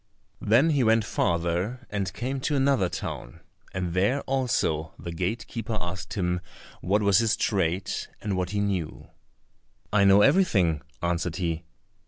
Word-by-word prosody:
Then 125 Hz, +10 st, +4 dB
he 140 Hz, -4 st, +2 dB
went 110 Hz, -1 st, +3 dB
farther 85 Hz, +10 st, -1 dB
and 100 Hz, -2 st, -2 dB
came 130 Hz, +7 st, -3 dB
to 145 Hz, +3 st, -1 dB
another 135 Hz, -9 st, +2 dB
town, -, -, -6 dB, 0.3 s
and 90 Hz, -2 st, -3 dB
there 100 Hz, +10 st, +2 dB
also 120 Hz, -, -1 dB
the 85 Hz, -, -6 dB
gatekeeper 110 Hz, +5 st, -3 dB
asked 90 Hz, 0 st, -5 dB
him 90 Hz, -3 st, 0 dB, 0.4 s
what 105 Hz, +3 st, +1 dB
was 100 Hz, -2 st, +5 dB
his 115 Hz, -1 st, +2 dB
trade, 95 Hz, -2 st, 0 dB, 0.3 s
and 105 Hz, -3 st, -2 dB
what 90 Hz, -1 st, -1 dB
he 100 Hz, +1 st, -1 dB
knew. 95 Hz, -6 st, -3 dB, 0.8 s
"I 105 Hz, -1 st, +5 dB
know 100 Hz, +1 st, +7 dB
everything," 100 Hz, -, +3 dB, 0.2 s
answered 85 Hz, -1 st, -1 dB
he. 85 Hz, -2 st, -2 dB
100 Hz, 145 wpm, -26 LUFS, 85-115 Hz, 0.8 s, know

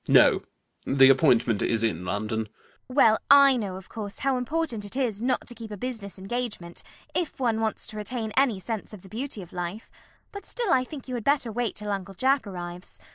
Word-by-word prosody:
No: -, -, +6 dB, 0.4 s
the 135 Hz, 0 st, +6 dB
appointment 120 Hz, -6 st, +3 dB
is 115 Hz, -1 st, +2 dB
in 90 Hz, -6 st, 0 dB
London. 110 Hz, +3 st, -2 dB, 0.4 s
CECILY. 255 Hz, -, -9 dB
Well, 220 Hz, -6 st, +6 dB
I 280 Hz, -1 st, +8 dB
know, 205 Hz, -6 st, -3 dB
of 190 Hz, 0 st, -10 dB
course, 210 Hz, -3 st, -7 dB
how 270 Hz, -1 st, +3 dB
important 250 Hz, -3 st, -2 dB
it 205 Hz, +4 st, -6 dB
is 235 Hz, -6 st, -1 dB
not 255 Hz, +1 st, 0 dB
to 240 Hz, -, -7 dB
keep 230 Hz, -2 st, -9 dB
a 210 Hz, -, -6 dB
business 220 Hz, -4 st, -5 dB
engagement, 195 Hz, -4 st, -4 dB, 0.3 s
if 340 Hz, -5 st, -2 dB
one 230 Hz, -4 st, +1 dB
wants 220 Hz, -1 st, -1 dB
to 215 Hz, -, -7 dB
retain 220 Hz, +1 st, -4 dB
any 255 Hz, -7 st, +3 dB
sense 215 Hz, +1 st, -5 dB
of 185 Hz, -, -15 dB
the 190 Hz, -, -13 dB
beauty 225 Hz, -1 st, -5 dB
of 175 Hz, -, -15 dB
life, 180 Hz, +4 st, -5 dB, 0.4 s
but 405 Hz, -, -9 dB
still 470 Hz, -7 st, 0 dB
I 255 Hz, -1 st, +3 dB
think 275 Hz, 0 st, -9 dB
you 255 Hz, -, -5 dB
had 240 Hz, -3 st, -3 dB
better 280 Hz, -4 st, +2 dB
wait 235 Hz, -1 st, -1 dB
till 210 Hz, 0 st, -4 dB
Uncle 195 Hz, -1 st, -4 dB
Jack 265 Hz, +1 st, +2 dB
arrives. 175 Hz, -1 st, -7 dB
220 Hz, 210 wpm, -26 LUFS, 185-255 Hz, 0.4 s, I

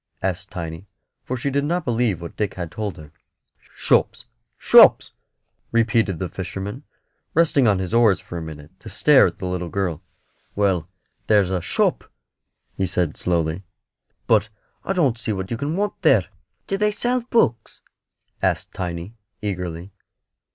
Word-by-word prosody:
asked 95 Hz, 0 st, -2 dB
Tiny; 85 Hz, 0 st, -7 dB, 0.4 s
for 130 Hz, -, -3 dB
she 140 Hz, +3 st, -2 dB
did 140 Hz, +1 st, +1 dB
not 170 Hz, +3 st, -1 dB
believe 115 Hz, -7 st, 0 dB
what 85 Hz, -, -8 dB
Dick 105 Hz, -3 st, -2 dB
had 85 Hz, -3 st, -5 dB
told 105 Hz, +2 st, -4 dB
her. 75 Hz, -1 st, -12 dB, 0.6 s
"Shops, -, -, +1 dB, 0.3 s
shops!" -, -, +6 dB, 0.6 s
repeated 115 Hz, -5 st, +2 dB
the 95 Hz, -, -3 dB
fisherman, 95 Hz, +7 st, -6 dB, 0.5 s
resting 150 Hz, -6 st, +4 dB
on 100 Hz, -2 st, +3 dB
his 95 Hz, +1 st, -4 dB
oars 115 Hz, -5 st, +4 dB
for -, -, -10 dB
a 85 Hz, -, -3 dB
minute 75 Hz, -2 st, -9 dB
to -, -, -10 dB
stare -, -, +5 dB
at -, -, -6 dB
the -, -, -6 dB
little 90 Hz, -1 st, -3 dB
girl. 90 Hz, -5 st, -2 dB, 0.5 s
"Well, 95 Hz, -5 st, +1 dB, 0.4 s
there's 100 Hz, -4 st, +3 dB
a 90 Hz, -2 st, 0 dB
shop," 85 Hz, -, 0 dB, 0.7 s
he 95 Hz, -, -1 dB
said, 90 Hz, -3 st, -1 dB
slowly; 85 Hz, 0 st, -1 dB, 0.6 s
"but 110 Hz, -1 st, +3 dB, 0.3 s
I -, -, -1 dB
don't 140 Hz, -11 st, +1 dB
see 110 Hz, -2 st, -2 dB
what 95 Hz, +1 st, -5 dB
you -, -, 0 dB
can 145 Hz, +5 st, -2 dB
want 205 Hz, +2 st, 0 dB
there." 130 Hz, -, +4 dB, 0.4 s
"Do 195 Hz, -, -2 dB
they 210 Hz, 0 st, +3 dB
sell 245 Hz, +4 st, 0 dB
books?" 120 Hz, -, +1 dB, 0.6 s
asked -, -, -1 dB
Tiny, 90 Hz, +2 st, -5 dB, 0.3 s
eagerly. 90 Hz, -3 st, -5 dB
100 Hz, 155 wpm, -22 LUFS, 90-120 Hz, 0.7 s, shops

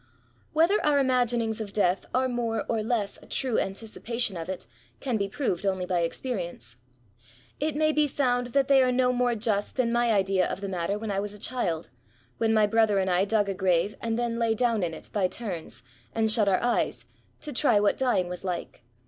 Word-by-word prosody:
Whether 335 Hz, +7 st, +3 dB
our 295 Hz, -1 st, +3 dB
imaginings 240 Hz, -4 st, +1 dB
of 200 Hz, -2 st, -6 dB
Death 185 Hz, -2 st, +1 dB
are 260 Hz, +1 st, +2 dB
more 240 Hz, -2 st, -2 dB
or 225 Hz, -2 st, 0 dB
less 215 Hz, -2 st, -1 dB
a -, -, -16 dB
true 255 Hz, -4 st, 0 dB
anticipation 225 Hz, +2 st, -2 dB
of 165 Hz, +1 st, -6 dB
it, 190 Hz, -, -5 dB, 0.3 s
can 255 Hz, -3 st, -2 dB
be 200 Hz, -2 st, -1 dB
proved 195 Hz, -, -2 dB
only 190 Hz, -2 st, 0 dB
by 180 Hz, -1 st, 0 dB
experience. 170 Hz, -, -4 dB, 0.8 s
It 305 Hz, +1 st, -1 dB
may 310 Hz, +1 st, +3 dB
be 300 Hz, -1 st, +2 dB
found 245 Hz, -3 st, 0 dB
that 270 Hz, +2 st, +1 dB
they 275 Hz, -1 st, +6 dB
are 255 Hz, -1 st, +3 dB
no 250 Hz, 0 st, +2 dB
more 245 Hz, -1 st, +1 dB
just 210 Hz, -2 st, -1 dB
than 250 Hz, -3 st, +1 dB
my 235 Hz, 0 st, +2 dB
idea 195 Hz, -3 st, +2 dB
of -, -, -4 dB
the 200 Hz, -, -4 dB
matter 185 Hz, +1 st, -2 dB
when 215 Hz, 0 st, -4 dB
I 195 Hz, -, 0 dB
was 205 Hz, +1 st, -4 dB
a -, -, -12 dB
child, 175 Hz, -, -2 dB, 0.5 s
when 225 Hz, -1 st, +2 dB
my 215 Hz, -1 st, +4 dB
brother 220 Hz, -1 st, +3 dB
and 190 Hz, -1 st, +1 dB
I 180 Hz, +2 st, +3 dB
dug 205 Hz, -1 st, +1 dB
a 195 Hz, -, -1 dB
graye, 185 Hz, +1 st, +1 dB
and 225 Hz, -1 st, -1 dB
then 235 Hz, -1 st, -1 dB
lay 225 Hz, -1 st, +2 dB
down 230 Hz, -2 st, +1 dB
in 165 Hz, -2 st, -2 dB
it, -, -, -11 dB
by 195 Hz, -3 st, +2 dB
turns, 175 Hz, -, -6 dB, 0.3 s
and 220 Hz, -1 st, +2 dB
shut 215 Hz, -2 st, +3 dB
our 190 Hz, -, +1 dB
eyes, 240 Hz, 0 st, 0 dB, 0.4 s
to 295 Hz, -, -6 dB
try 215 Hz, -3 st, +3 dB
what 205 Hz, 0 st, +2 dB
dying 245 Hz, -9 st, +1 dB
was 180 Hz, +1 st, -6 dB
like. 180 Hz, -8 st, -4 dB
220 Hz, 210 wpm, -27 LUFS, 195-245 Hz, 0.8 s, they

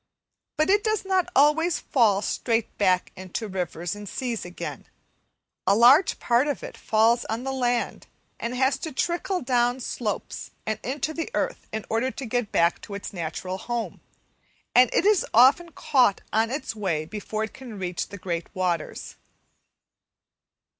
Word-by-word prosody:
But 310 Hz, +5 st, +3 dB
it 410 Hz, +1 st, +3 dB
does 435 Hz, -2 st, 0 dB
not 375 Hz, -2 st, +1 dB
always 305 Hz, +5 st, +4 dB
fall 215 Hz, -6 st, +2 dB
straight 230 Hz, -2 st, -1 dB
back 185 Hz, -3 st, +2 dB
into 185 Hz, +4 st, -5 dB
the -, -, -7 dB
rivers 175 Hz, -1 st, -3 dB
and 205 Hz, -1 st, -8 dB
seas 240 Hz, -4 st, -3 dB
again, 175 Hz, 0 st, -7 dB, 0.8 s
a 195 Hz, -, +5 dB
large 260 Hz, -, +6 dB
part 245 Hz, +4 st, +2 dB
of 290 Hz, -, -2 dB
it -, -, -7 dB
falls 225 Hz, +2 st, +2 dB
on 225 Hz, +3 st, -3 dB
the 270 Hz, -, -2 dB
land, 245 Hz, -2 st, -1 dB, 0.3 s
and 235 Hz, +2 st, -3 dB
has 265 Hz, +2 st, +2 dB
to 320 Hz, -, -5 dB
trickle 345 Hz, +5 st, -1 dB
down 245 Hz, 0 st, +2 dB
slopes 225 Hz, -4 st, -4 dB, 0.2 s
and 220 Hz, -, -2 dB
into 295 Hz, +5 st, -2 dB
the 325 Hz, +1 st, -4 dB
earth, -, -, -2 dB
in 220 Hz, -1 st, -4 dB
order 230 Hz, +4 st, 0 dB
to 265 Hz, 0 st, -6 dB
get 245 Hz, -2 st, -1 dB
back 170 Hz, +1 st, +2 dB
to 200 Hz, -, -8 dB
its 200 Hz, -, -7 dB
natural 185 Hz, +2 st, -4 dB
home, 240 Hz, +1 st, -4 dB, 0.7 s
and 250 Hz, -1 st, +6 dB
it -, -, +2 dB
is 420 Hz, -2 st, +4 dB
often 275 Hz, +9 st, +6 dB
caught 250 Hz, -12 st, +2 dB
on 220 Hz, +1 st, +2 dB
its 270 Hz, -3 st, -4 dB
way 175 Hz, -7 st, -1 dB
before 215 Hz, +4 st, -4 dB
it 220 Hz, -, -5 dB
can 245 Hz, -5 st, -9 dB
reach 180 Hz, -2 st, -3 dB
the 200 Hz, -, -9 dB
great 170 Hz, -3 st, -3 dB
waters. 180 Hz, -3 st, -2 dB
235 Hz, 165 wpm, -25 LUFS, 200-270 Hz, 0.8 s, large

